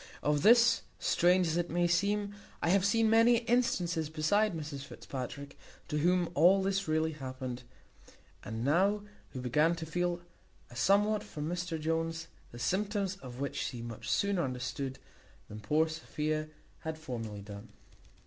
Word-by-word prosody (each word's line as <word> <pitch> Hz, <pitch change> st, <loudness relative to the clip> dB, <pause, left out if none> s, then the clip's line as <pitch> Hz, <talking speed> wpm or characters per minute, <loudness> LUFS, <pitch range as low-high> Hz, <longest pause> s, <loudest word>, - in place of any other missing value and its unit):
Of 150 Hz, -1 st, +2 dB
this, 235 Hz, +3 st, +6 dB, 0.2 s
strange 180 Hz, +1 st, +3 dB
as 165 Hz, 0 st, 0 dB
it 175 Hz, 0 st, -1 dB
may 175 Hz, +2 st, +1 dB
seem, 200 Hz, +4 st, +1 dB, 0.3 s
I -, -, 0 dB
have 190 Hz, +1 st, +4 dB
seen 225 Hz, +3 st, +3 dB
many 230 Hz, +2 st, +5 dB
instances 180 Hz, -10 st, +1 dB
besides 175 Hz, +6 st, +1 dB
Mrs 150 Hz, -3 st, -5 dB
Fitzpatrick, 140 Hz, 0 st, -7 dB, 0.3 s
to 150 Hz, -, 0 dB
whom 175 Hz, +1 st, +2 dB
all 180 Hz, +5 st, +5 dB
this 195 Hz, -1 st, 0 dB
really 160 Hz, +1 st, +1 dB
happened, 130 Hz, -3 st, -6 dB, 0.8 s
and 110 Hz, -, -6 dB
who 110 Hz, -, -3 dB
now 195 Hz, +9 st, +2 dB, 0.4 s
began 150 Hz, +7 st, +2 dB
to 165 Hz, -1 st, -6 dB
feel 175 Hz, +2 st, -1 dB, 0.5 s
a -, -, -12 dB
somewhat 205 Hz, -, +3 dB
for 150 Hz, -, -7 dB
Mr 175 Hz, 0 st, -3 dB
Jones, 165 Hz, +1 st, -2 dB, 0.2 s
the 120 Hz, -, -10 dB
symptoms 200 Hz, -, -1 dB
of 125 Hz, -8 st, -10 dB
which 140 Hz, 0 st, -3 dB
she 120 Hz, -3 st, -5 dB
much 115 Hz, -2 st, -7 dB
sooner 200 Hz, -3 st, +1 dB
understood 130 Hz, +1 st, -4 dB, 0.5 s
than 105 Hz, -, -8 dB
poor 150 Hz, +10 st, +2 dB
Sophia 155 Hz, -1 st, -3 dB, 0.3 s
had 160 Hz, 0 st, -5 dB
formerly 115 Hz, -9 st, -6 dB
done. 100 Hz, 0 st, -10 dB
165 Hz, 150 wpm, -32 LUFS, 140-190 Hz, 0.8 s, this